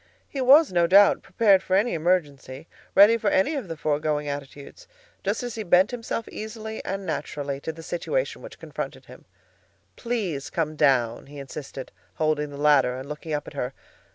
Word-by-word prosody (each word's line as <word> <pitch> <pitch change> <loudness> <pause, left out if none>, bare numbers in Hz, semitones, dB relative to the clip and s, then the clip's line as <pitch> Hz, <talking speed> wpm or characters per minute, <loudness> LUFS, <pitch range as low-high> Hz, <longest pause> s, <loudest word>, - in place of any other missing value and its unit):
He 275 - -5
was 280 +2 +6
no 175 -1 +3
doubt 200 +3 +6
prepared 200 -5 +3
for 185 - 0
any 215 +5 +2
emergency, 155 -4 -1 0.3
ready 210 +4 +7
for - - 0
any 290 +1 +2
one 285 - -2
of 190 - -14
the 165 - -5
foregoing 150 0 -1
attitudes, 145 - -8 0.4
just - - -1
as 245 -2 -4
he 220 - -5
bent 185 +2 +4
himself 230 -2 -4
easily 220 0 -7
and 195 0 -4
naturally 145 -4 -4
to 160 - -4
the 165 +1 -12
situation - - -2
which - - -11
confronted - - -7
him. - - -15 0.7
"Please 205 - -3
come 155 -2 -2
down," 130 -6 +2
he 145 +1 -12
insisted, 135 -1 -8 0.2
holding 155 -1 0
the 140 - -9
ladder 140 -4 +3
and 130 +1 -8
looking 150 +2 -7
up 145 -1 -3
at - - -9
her. 125 +2 -4
165 Hz, 180 wpm, -25 LUFS, 145-220 Hz, 0.7 s, ready